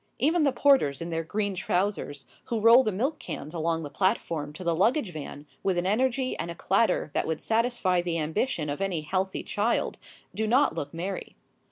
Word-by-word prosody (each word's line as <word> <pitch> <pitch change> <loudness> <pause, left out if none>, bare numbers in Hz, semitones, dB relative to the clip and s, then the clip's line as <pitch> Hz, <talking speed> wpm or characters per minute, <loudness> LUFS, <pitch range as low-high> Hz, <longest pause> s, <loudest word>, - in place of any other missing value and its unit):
Even 320 +7 +2
the 285 -2 +3
porters 260 - +3
in 170 +1 -5
their 165 0 -1
green 205 +4 -2
trousers, 180 -7 -1 0.2
who 230 - -2
roll 230 +4 +7
the 215 - 0
milk 260 +11 -1
cans 150 - -6
along 165 0 -1
the 145 - -6
platform 165 -6 0
to 155 +5 -9
the 170 -1 +1
luggage 220 - +1
van 145 -1 -7 0.2
with 190 -2 0
an 175 - 0
energy 255 +5 +1
and 170 - -3
a 170 - -5
clatter 195 -3 +1
that - - 0
would 160 -1 -1
satisfy 225 -6 +1
the 175 -1 -2
ambition 160 - -1
of 145 +5 -4
any 190 -5 -1
healthy 185 +5 -2
child, 215 +3 -1 0.3
do 220 0 -1
not 255 +6 +4
look 145 0 -4
merry. 180 +4 -5
185 Hz, 195 wpm, -27 LUFS, 165-230 Hz, 0.3 s, roll